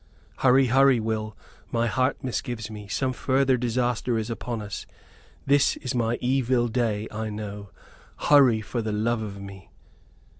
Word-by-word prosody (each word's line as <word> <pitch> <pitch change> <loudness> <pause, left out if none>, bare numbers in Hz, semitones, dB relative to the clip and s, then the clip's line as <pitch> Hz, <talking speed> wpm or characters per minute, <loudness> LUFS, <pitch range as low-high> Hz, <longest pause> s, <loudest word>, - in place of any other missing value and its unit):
"Hurry, 130 +1 +5
hurry, 135 0 +4
Will; 110 -1 -3 0.3
my 115 0 +1
heart 125 +4 0
misgives 120 -3 -4
me. 105 -1 -8
Some 130 +5 -1
further 130 +1 +2
disaster 120 0 0
is 110 +1 -3
upon 115 0 -4
us. 105 -1 -6 0.6
This 140 0 +3
is 130 - -4
my 120 -1 0
evil 125 -1 +1
day, 110 -3 -1
I 110 +1 -4
know. 105 -1 -6 0.5
Hurry, 130 -7 +5
for 115 +3 -3
the 110 -1 -3
love 110 +2 0
of 100 -2 -6
me!" 100 -2 -10
115 Hz, 150 wpm, -25 LUFS, 110-130 Hz, 0.6 s, Hurry